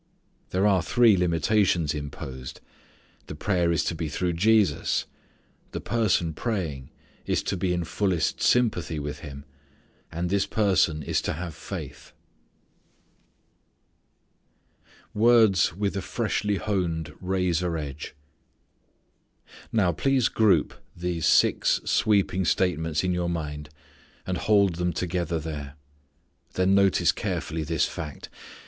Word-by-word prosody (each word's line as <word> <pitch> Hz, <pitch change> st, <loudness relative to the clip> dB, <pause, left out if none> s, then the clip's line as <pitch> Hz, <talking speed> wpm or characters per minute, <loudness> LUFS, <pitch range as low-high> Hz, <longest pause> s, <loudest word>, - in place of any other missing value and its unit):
There 95 Hz, +2 st, +1 dB
are 95 Hz, -3 st, +4 dB
three 115 Hz, +3 st, +4 dB
limitations 90 Hz, -1 st, +1 dB
imposed: 70 Hz, -3 st, -7 dB, 0.7 s
the -, -, -7 dB
prayer 85 Hz, 0 st, +1 dB
is 85 Hz, -, +1 dB
to -, -, -1 dB
be 80 Hz, -2 st, -4 dB
through 90 Hz, +4 st, -1 dB
Jesus; 100 Hz, -2 st, +2 dB, 0.7 s
the -, -, -3 dB
person 105 Hz, -7 st, 0 dB
praying 80 Hz, -, -3 dB, 0.4 s
is -, -, 0 dB
to -, -, -2 dB
be 90 Hz, 0 st, -1 dB
in 90 Hz, -1 st, 0 dB
fullest 90 Hz, 0 st, -1 dB
sympathy 105 Hz, -10 st, +2 dB
with 75 Hz, 0 st, -5 dB
Him; 70 Hz, -2 st, -9 dB, 0.7 s
and 85 Hz, +2 st, -2 dB
this 100 Hz, 0 st, +1 dB
person 95 Hz, -7 st, +1 dB
is -, -, 0 dB
to -, -, -2 dB
have 85 Hz, +1 st, -6 dB
faith. -, -, -8 dB, 3.0 s
Words 110 Hz, -6 st, +4 dB
With 100 Hz, 0 st, -2 dB
a 95 Hz, -, -2 dB
Freshly 105 Hz, -2 st, -1 dB
Honed 90 Hz, -6 st, -2 dB
Razor 90 Hz, -2 st, 0 dB
Edge. 75 Hz, -1 st, -6 dB, 1.6 s
Now 100 Hz, -6 st, +2 dB
please 130 Hz, -, +1 dB
group 100 Hz, -8 st, +3 dB, 0.2 s
these 85 Hz, -2 st, -1 dB
six -, -, +3 dB
sweeping 100 Hz, -3 st, +2 dB
statements 80 Hz, -3 st, 0 dB
in 90 Hz, -1 st, 0 dB
your 90 Hz, -1 st, -1 dB
mind 75 Hz, -3 st, -4 dB, 0.6 s
and 90 Hz, -2 st, -2 dB
hold 100 Hz, -5 st, +3 dB
them 90 Hz, 0 st, -1 dB
together 85 Hz, -1 st, -2 dB
there. 75 Hz, -3 st, -6 dB, 0.8 s
Then 95 Hz, +1 st, +2 dB
notice 100 Hz, -1 st, +4 dB
carefully 80 Hz, +1 st, -3 dB
this 80 Hz, -1 st, 0 dB
fact. 75 Hz, -2 st, -7 dB
90 Hz, 120 wpm, -26 LUFS, 80-100 Hz, 3.0 s, are